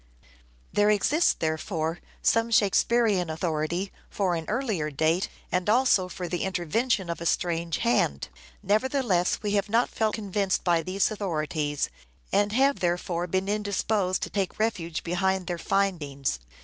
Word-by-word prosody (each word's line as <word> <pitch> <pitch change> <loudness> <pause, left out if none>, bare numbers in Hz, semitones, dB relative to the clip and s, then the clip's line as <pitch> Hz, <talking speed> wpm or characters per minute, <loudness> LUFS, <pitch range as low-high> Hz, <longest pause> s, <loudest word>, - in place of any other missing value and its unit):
There 205 0 +4
exists, 285 - +3
therefore, 160 +1 -2 0.2
some 230 0 +3
Shakespearean 210 -3 +3
authority 165 +3 -2 0.2
both - - -17
for 190 -3 +2
an 165 -1 -3
earlier 215 - -1
date 160 +5 +1 0.2
and 180 +2 0
also 220 -6 +3
for 180 0 -5
the 175 +1 -3
intervention 190 +3 0
of 170 0 -4
a - - -4
strange 170 -1 0
hand. 235 0 +1 0.3
Nevertheless, 215 -3 +1
we 205 - -1
have 200 0 0
not 230 +3 +2
felt 220 -1 0
convinced 200 -2 -1
by 170 -2 +3
these 190 +5 0
authorities; 155 -7 -2 0.4
and 205 0 +3
have 275 +3 +3
therefore 175 0 -1
been 190 +2 -1
indisposed 205 -2 0
to - - -4
take 195 -3 -2
refuge 175 -7 -1
behind 190 +2 0
their 175 -1 -3
findings. 155 - -1
190 Hz, 145 wpm, -27 LUFS, 170-210 Hz, 0.4 s, There